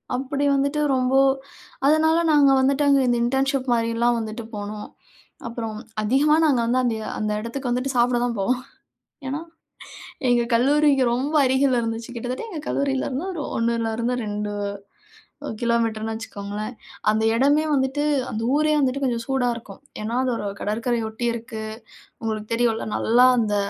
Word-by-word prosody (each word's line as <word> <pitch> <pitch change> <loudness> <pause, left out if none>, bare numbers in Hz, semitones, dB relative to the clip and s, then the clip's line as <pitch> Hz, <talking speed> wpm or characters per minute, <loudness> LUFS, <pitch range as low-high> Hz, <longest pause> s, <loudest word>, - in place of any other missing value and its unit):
அப்படி 275 +2 -2
வந்துட்டு 280 +2 0
ரொம்போ 255 +1 +2 0.7
அதனால 315 +2 +4
நாங்க 285 -2 +5
வந்துட்டு 275 +2 +2
அங்க 275 -1 +5
இந்த 240 -1 +2
இன்டர்ன்ஷிப் 270 +1 0
மாதிரிலாம் 230 +1 +1
வந்துட்டு 220 +1 -5
போனோம். 210 +1 -6 0.6
அப்பறம் 225 -2 -5 0.2
அதிகமா 275 +8 +3
நாங்க 275 -6 +3
வந்து 245 +2 +2
அந்த 240 -2 +1 0.2
அந்த 215 0 -1
இடத்துக்கு 245 +4 -4
வந்துட்டு, 255 +2 -1
சாப்பிட 240 0 +3
தான் 235 -3 -2
போவோம். 250 +6 0 0.7
ஏன்னா 275 +3 -2 0.9
எங்கள் 240 -1 +2
கல்லூரிக்கு 280 +2 +4
ரொம்ப 280 +6 -1
அருகில 260 -1 +3
இருந்துச்சு. 225 +1 -4
கிட்டத்தட்ட 245 - -4
எங்க 325 -6 -5
கல்லூரியில 275 -1 0
இருந்து, 275 +7 -3
ஒரு 330 -5 -5
1 230 +1 +1
லருந்து 235 +2 -1
2 210 0 -3 1.1
கிலோமீட்டர்ன்னு 225 -2 0
வச்சுக்கோங்களேன். 210 0 -6 0.4
அந்த 220 +1 +2
இடமே 285 +5 +3
வந்துட்டு, 265 +2 0 0.3
அந்த 220 - -3
ஊரே 305 0 +2
வந்துட்டு 275 0 0
கொஞ்சம் 235 -2 -1
சூடா 265 -2 +1
இருக்கும். 215 -1 -11 0.2
ஏன்னா 220 +3 -3
அது 255 - 0
ஒரு - - -5
கடற்கரையை 230 +2 -1
ஒட்டி 240 +2 -3
இருக்கு. 225 -1 -6 0.6
உங்களுக்கு 215 -1 -3
தெரியும்ல 230 -1 +1
நல்லா 245 +3 +4
அந்த 210 -2 0
245 Hz, 145 wpm, -23 LUFS, 225-270 Hz, 1.1 s, நாங்க